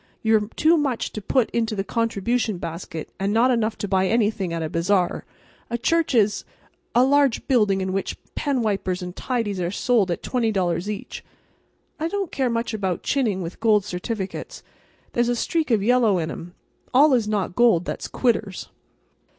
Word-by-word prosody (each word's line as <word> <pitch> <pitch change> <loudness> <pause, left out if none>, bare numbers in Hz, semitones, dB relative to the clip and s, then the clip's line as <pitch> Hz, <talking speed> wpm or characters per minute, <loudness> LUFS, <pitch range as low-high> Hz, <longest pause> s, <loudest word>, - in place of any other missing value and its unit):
You're 220 -2 +2
too 325 +2 +4
much 275 -6 -1
to 215 - -5
put 235 +4 +1
into 225 -2 -1
the 195 - -1
contribution 230 -1 -1
basket, 165 -1 -6
and 195 +1 0
not 235 +4 +4
enough 225 -2 0
to 205 - -3
buy 190 -1 +2
anything 210 -4 +1
at 165 -1 -2
a - - -1
bazaar. 175 +3 0 0.4
A 235 - -1
church 325 +4 +1
is—a 215 +3 0
large 280 -2 +2
building 210 -7 +3
in 190 0 -2
which 195 - -2 0.2
penwipers 210 -9 -1
and 180 0 -7
tidies 225 -7 -2
are 175 - -1
sold 205 0 +1
at 170 - -3
$20 195 -7 0
each." 210 -1 -6 0.8
I 320 - 0
don't 390 0 -3
care 260 -2 0
much 230 0 -2
about 190 -5 -2
chinning 220 -10 0
with 170 +1 -7
gold 215 -3 +3
certificates. 195 +1 -5 0.5
There's 240 0 +1
a 245 - +1
streak 320 +6 -1
of 220 -5 +2
yellow 230 -4 +3
in 160 -2 -2
'em. 175 +2 -9 0.4
All 285 +2 +6
is 235 -4 +2
not 205 -4 -1
gold 225 -8 +4
that's - - -4
quitters. 220 -6 -1
215 Hz, 170 wpm, -23 LUFS, 190-245 Hz, 0.8 s, All